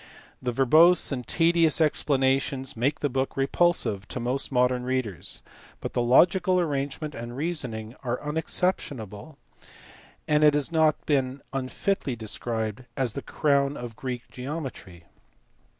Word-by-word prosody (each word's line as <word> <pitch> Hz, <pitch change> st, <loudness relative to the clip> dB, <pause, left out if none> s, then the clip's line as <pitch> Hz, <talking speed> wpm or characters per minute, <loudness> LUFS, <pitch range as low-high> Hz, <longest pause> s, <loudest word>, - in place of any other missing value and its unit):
The 125 Hz, -, -1 dB
verbose 155 Hz, +9 st, +5 dB
and 125 Hz, -3 st, -4 dB
tedious 165 Hz, -2 st, +3 dB
explanations 135 Hz, -3 st, +1 dB
make 130 Hz, +6 st, -1 dB
the 145 Hz, -, +2 dB
book 135 Hz, 0 st, -2 dB
re 135 Hz, -, +2 dB
pulsive 135 Hz, -, +1 dB
to -, -, -4 dB
most 125 Hz, +4 st, -2 dB
modern 125 Hz, -1 st, +2 dB
readers; 125 Hz, -, -3 dB, 0.4 s
but -, -, -6 dB
the -, -, +1 dB
logical 180 Hz, +9 st, +4 dB
arrangement 145 Hz, -1 st, -2 dB
and 120 Hz, 0 st, -7 dB
reasoning 125 Hz, -8 st, -3 dB
are 125 Hz, -2 st, -2 dB
unexceptionable, 150 Hz, -, -2 dB, 0.9 s
and 150 Hz, 0 st, +3 dB
it 150 Hz, -1 st, +6 dB
has 145 Hz, 0 st, +1 dB, 0.4 s
been 135 Hz, -3 st, +1 dB
not -, -, -26 dB
unfitly 135 Hz, +2 st, -2 dB
described 110 Hz, +1 st, -4 dB
as 130 Hz, -5 st, 0 dB
the 140 Hz, -, -5 dB
crown 140 Hz, -1 st, +1 dB
of 120 Hz, -2 st, -7 dB
Greek 125 Hz, -1 st, -5 dB
geometry. 125 Hz, -, -7 dB
135 Hz, 135 wpm, -26 LUFS, 120-150 Hz, 0.9 s, it